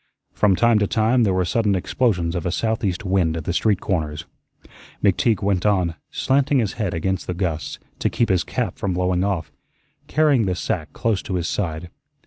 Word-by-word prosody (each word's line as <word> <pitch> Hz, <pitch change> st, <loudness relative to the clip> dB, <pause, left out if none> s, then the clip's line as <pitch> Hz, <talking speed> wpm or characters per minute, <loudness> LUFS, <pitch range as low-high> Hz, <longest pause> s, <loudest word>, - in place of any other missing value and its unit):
From 100 Hz, -3 st, +3 dB
time 115 Hz, +1 st, +4 dB
to 100 Hz, -, +1 dB
time 115 Hz, +4 st, +2 dB
there 100 Hz, -5 st, +3 dB
were 90 Hz, -1 st, +1 dB
sudden 105 Hz, +1 st, +1 dB
explosions 90 Hz, -3 st, 0 dB
of 90 Hz, -1 st, -2 dB
a -, -, 0 dB
southeast 105 Hz, -2 st, -1 dB
wind 90 Hz, -4 st, +1 dB
at 80 Hz, -, -4 dB
the 85 Hz, -, -2 dB
street 100 Hz, +1 st, +2 dB
corners. 80 Hz, -5 st, -2 dB, 0.8 s
McTeague 105 Hz, +2 st, +2 dB
went 95 Hz, -3 st, +1 dB
on, 95 Hz, -5 st, +2 dB, 0.2 s
slanting 140 Hz, +1 st, +1 dB
his 110 Hz, -6 st, 0 dB
head 100 Hz, -6 st, -2 dB
against 95 Hz, +3 st, -2 dB
the 90 Hz, -, -2 dB
gusts, 85 Hz, -4 st, -3 dB, 0.2 s
to -, -, +1 dB
keep 115 Hz, -, 0 dB
his 90 Hz, -2 st, +2 dB
cap -, -, -3 dB
from 95 Hz, -3 st, -1 dB
blowing 90 Hz, 0 st, +1 dB
off, 95 Hz, -5 st, -2 dB, 0.6 s
carrying 140 Hz, -7 st, +3 dB
the 90 Hz, -, 0 dB
sack 90 Hz, -6 st, -3 dB
close 115 Hz, -5 st, 0 dB
to 95 Hz, -, -4 dB
his 85 Hz, -2 st, -1 dB
side. 85 Hz, -3 st, -3 dB
95 Hz, 190 wpm, -22 LUFS, 90-110 Hz, 0.8 s, time